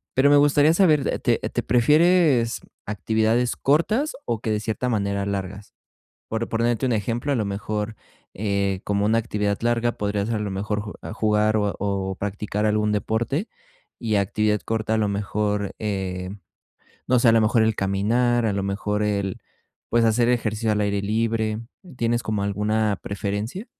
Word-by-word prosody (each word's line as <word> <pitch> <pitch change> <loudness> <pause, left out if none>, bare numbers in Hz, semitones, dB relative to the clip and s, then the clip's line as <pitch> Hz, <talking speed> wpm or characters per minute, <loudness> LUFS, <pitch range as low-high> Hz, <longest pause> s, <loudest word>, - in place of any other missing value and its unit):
Pero 135 +2 +5
me 145 - +6
gustaría 145 +2 +5
saber, 155 -6 +3
te - - +2
te - - -3
¿Prefieres 150 -1 +3 0.3
actividades 110 +4 0
cortas, 215 - +1
o 115 -2 -1
que 110 - -2
de 105 - 0
cierta 115 +3 -2
manera 100 -2 -1
largas? 100 0 -5 0.6
Por 110 +1 -2
ponerte 115 +2 0
un 120 - +1
ejemplo, 115 +6 -1
a - - +2
lo 110 - 0
mejor, 105 +2 -3 0.4
eh, 100 -1 -1
como 100 0 0
una 115 +2 +3
actividad 105 -3 -1
larga, 120 0 +1
podría 100 -2 -2
ser, 115 +1 -1
a - - -3
lo 105 -1 -3
mejor, 105 +2 -2
ju 105 - -7
a - - -6
jugar 110 0 +2
o 105 -1 0
o 95 -1 -2
practicar 105 +1 -3
algún 105 0 +1
deporte. 120 - -1 0.5
Y 110 -3 -1
actividad 105 +1 +1
corta, 110 0 -1
a - - +1
lo 105 - +1
mejor, 105 0 -1
eh, 95 -3 -3 0.8
no 125 0 +4
sé. 120 -1 +5
A - - +6
lo 115 - +5
mejor 110 +1 +3
el 110 -1 +1
caminar. 115 +5 +1
A 110 - +1
lo 100 - -1
mejor 105 +1 -2
el 100 -2 -1 0.5
Pues 120 -1 +3
hacer 115 +2 +3
ejercicio 110 -2 0
al 105 - 0
aire 100 -1 0
libre. 110 +1 0 0.4
¿Tienes 120 0 +1
como 105 -2 -1
alguna 105 +1 0
preferencia? 105 - -4
110 Hz, 170 wpm, -23 LUFS, 100-115 Hz, 0.8 s, me